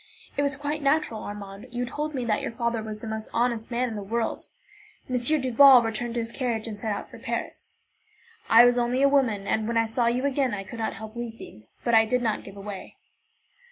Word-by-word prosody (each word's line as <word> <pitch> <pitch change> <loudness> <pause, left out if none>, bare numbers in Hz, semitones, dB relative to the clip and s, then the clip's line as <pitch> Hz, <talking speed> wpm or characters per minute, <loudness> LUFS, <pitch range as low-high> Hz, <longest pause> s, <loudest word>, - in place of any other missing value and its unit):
It - - +1
was 280 -1 0
quite 295 +2 -3
natural, 275 -6 +1
Armand. 205 +2 -8
You 245 0 -3
told 300 +4 -4
me 250 -2 -2
that 215 -2 0
your - - -3
father 235 0 -2
was 215 -1 -7
the 230 - -6
most 220 0 -4
honest 235 -2 0
man 250 +1 0
in 230 - -5
the 205 - -4
world. 225 +3 -3 0.6
M. 255 - -2
Duval 260 -1 +6
returned 230 +1 -3
to - - 0
his 230 0 -4
carriage, 235 -4 -2
and 210 -2 -6
set 220 +1 -2
out 205 - -4
for - - -13
Paris. - - -5 0.7
I 230 +2 +8
was 245 0 +4
only 245 +3 +1
a - - +7
woman, 250 -8 +2
and 220 +1 0
when 235 0 0
I 225 - +3
saw 235 +2 +1
you 245 +3 +1
again 270 -4 +1
I 195 - -5
could 230 +4 -9
not 220 - -2
help 220 +2 -9
weeping, 225 - -8 0.2
but 235 - 0
I 225 0 +6
did 250 +3 0
not 220 -2 -1
give 195 - -11
way. 200 -1 -8
235 Hz, 230 wpm, -26 LUFS, 220-255 Hz, 0.7 s, I